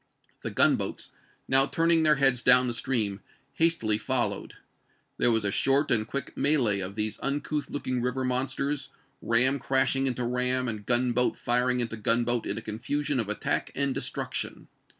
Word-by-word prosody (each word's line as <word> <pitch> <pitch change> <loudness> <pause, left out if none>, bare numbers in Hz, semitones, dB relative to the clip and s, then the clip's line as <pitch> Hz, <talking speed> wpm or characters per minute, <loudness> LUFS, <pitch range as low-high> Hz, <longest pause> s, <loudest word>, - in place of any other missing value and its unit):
The - - -3
gunboats, - - +1 0.4
now 135 +1 +3
turning 165 +1 +3
their 155 -1 +4
heads 135 -3 +2
down 125 0 +6
the 120 - -1
stream, 115 -5 -1 0.3
hastily 140 -11 +2
fol 120 -2 0
lowed. 100 - -8 0.6
There - - +2
was 110 -2 +1
a 100 - +1
short 135 +6 +1
and 110 -3 +2
quick 140 +3 -5
melee 130 -9 +2
of 95 +1 -5
these 110 0 -2
uncouth 145 +1 -2
looking 130 -3 -3
river 125 +2 -2
monsters, 135 +2 -2 0.3
ram 130 +4 +2
crashing 135 0 +1
into 125 -1 -1
ram 125 +1 0
and 105 -3 -6
gunboat 125 0 +1
firing 125 +1 +1
into 115 -2 -2
gunboat 120 +2 +1
in - - -2
a - - -4
confusion 135 +6 -2
of 110 -3 -2
attack 105 - -2
and 140 -1 0
destruction. - - -4
125 Hz, 165 wpm, -27 LUFS, 115-135 Hz, 0.6 s, down